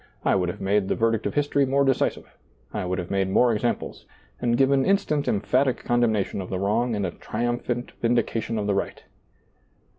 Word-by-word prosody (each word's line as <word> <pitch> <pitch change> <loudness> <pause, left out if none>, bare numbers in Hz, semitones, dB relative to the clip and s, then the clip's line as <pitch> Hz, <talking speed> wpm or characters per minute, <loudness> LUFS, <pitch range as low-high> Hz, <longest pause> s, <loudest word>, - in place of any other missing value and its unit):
I - - +4
would 90 -2 +1
have 90 - -6
made 100 0 +1
the - - 0
ver 115 0 +2
dict 115 -1 -1
of - - -5
history 145 -1 +2
more 140 +1 +2
decisive; 135 -2 0 0.5
I - - -2
would 90 +1 -2
liave 90 -2 -5
made 95 -1 +1
more 120 +5 +4
examples, 115 +2 -3 0.3
and 120 -1 +1
given 135 0 +3
instant 190 -6 +1
emphatic 125 +6 +1
con 120 0 +1
demnation 110 -4 0
of 90 - -7
the 95 - -2
wrong 110 +5 0
and 100 -2 -1
a 90 - -2
triumphant 120 +3 -3
vindi 120 -1 +2
cation 115 0 -3
of 105 - -1
the 100 - +1
right." 100 - -3
115 Hz, 205 wpm, -25 LUFS, 100-125 Hz, 0.5 s, I